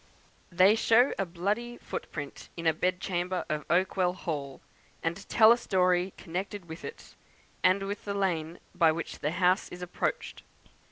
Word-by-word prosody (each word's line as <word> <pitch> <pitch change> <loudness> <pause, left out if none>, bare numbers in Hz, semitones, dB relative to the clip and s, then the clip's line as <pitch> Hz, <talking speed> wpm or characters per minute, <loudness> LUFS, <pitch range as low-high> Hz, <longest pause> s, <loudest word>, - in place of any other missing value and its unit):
They 185 +4 +6
show 230 +3 +4
a 195 - 0
bloody 210 +8 -2
footprint 145 -3 -7
in 165 - -5
a 160 - +4
bed 180 +3 0
chamber 180 0 -2
of 150 -2 -3
Oakwell 180 0 +2
Hall, 145 -7 -5 0.4
and 170 +4 -3
tell 220 0 +7
a 235 - +6
story 185 -3 +2
connected 185 +3 -5
with 160 +1 -9
it, 460 - -9 0.5
and 195 +2 +4
with 200 +1 -4
the 200 -1 -3
lane 170 -4 -1 0.2
by 170 -3 +4
which 165 0 -5
the 150 - -1
house 180 +3 +2
is 180 0 -8
approached. 475 - -3
180 Hz, 160 wpm, -29 LUFS, 170-200 Hz, 0.5 s, tell